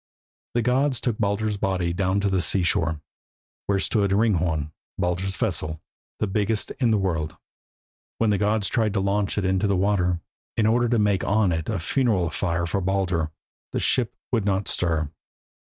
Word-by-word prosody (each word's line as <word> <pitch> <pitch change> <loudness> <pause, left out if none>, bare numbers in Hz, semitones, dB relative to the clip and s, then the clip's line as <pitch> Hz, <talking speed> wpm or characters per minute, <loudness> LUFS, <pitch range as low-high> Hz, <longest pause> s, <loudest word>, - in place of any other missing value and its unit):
The 120 - +2
gods 130 +2 +2
took 120 -4 -2
Baldur's 105 0 0
body 90 -3 0
down 95 +2 +1
to 100 - +1
the 95 -2 +1
sea 90 +3 +1
shore, 80 -3 0 0.7
where 100 - +2
stood 100 0 +1
Hringhorn, 90 -7 +1 0.3
Baldur's 90 +2 -1
vessel, 80 -6 -2 0.4
the - - 0
biggest 105 +1 0
in 125 -3 +3
the 110 - +3
world. 85 -6 -1 0.8
When 115 -2 +2
the 100 - +1
gods 105 -1 +2
tried 110 -3 +1
to - - +2
launch 100 +1 0
it 100 - +1
into 95 +2 +2
the 100 -1 +2
water, 90 -3 +1 0.4
in 110 - +3
order 120 +2 +3
to 120 - +2
make 105 -3 +2
on 105 -2 +2
it 80 -1 -2
a 110 - 0
funeral 95 - +1
fire 85 +1 -1
for 100 +3 -1
Baldur, 90 -4 0 0.4
the - - 0
ship 120 -4 +1 0.2
would 115 -4 +2
not 100 -1 0
stir. 80 -4 0
100 Hz, 175 wpm, -24 LUFS, 90-105 Hz, 0.8 s, in